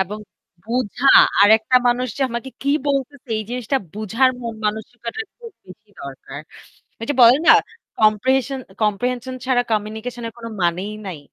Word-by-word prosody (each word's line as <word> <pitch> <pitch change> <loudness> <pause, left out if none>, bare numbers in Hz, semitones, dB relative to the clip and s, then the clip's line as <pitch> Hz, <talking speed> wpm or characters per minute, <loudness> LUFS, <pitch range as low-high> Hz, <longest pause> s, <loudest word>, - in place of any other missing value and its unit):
এবং 195 +3 -3 0.5
বুঝা 245 +2 -2 0.3
আর 205 - +7
একটা 225 +3 +2
মানুষ 245 +1 0
যে 280 - -1
আমাকে 235 +3 -5
কি 280 - 0 0.2
বলছে 280 0 -1 0.2
এই 215 - -3
জিনিসটা 250 +2 -2 0.2
বুঝার 220 +5 +1
মন 230 -1 -5
মানসিকতা 220 +2 -5 0.3
খুব 465 -2 -11
বেশি 205 +3 -16
দরকার। 135 0 -9 0.6
এই - - -3
যে - - +1
বলে 240 +1 +8
না - - +10 0.5
কম্প্রিহেশন 260 +5 +2 0.2
কম্প্রিহেনশন 245 +5 -1
ছাড়া 255 -2 +2
কমিউনিকেশন 220 +3 -3
এর 225 - -9
কোন 230 - -10 0.2
মানেই 180 +5 -1
নাই। 175 -5 -6
230 Hz, 155 wpm, -20 LUFS, 210-255 Hz, 0.6 s, না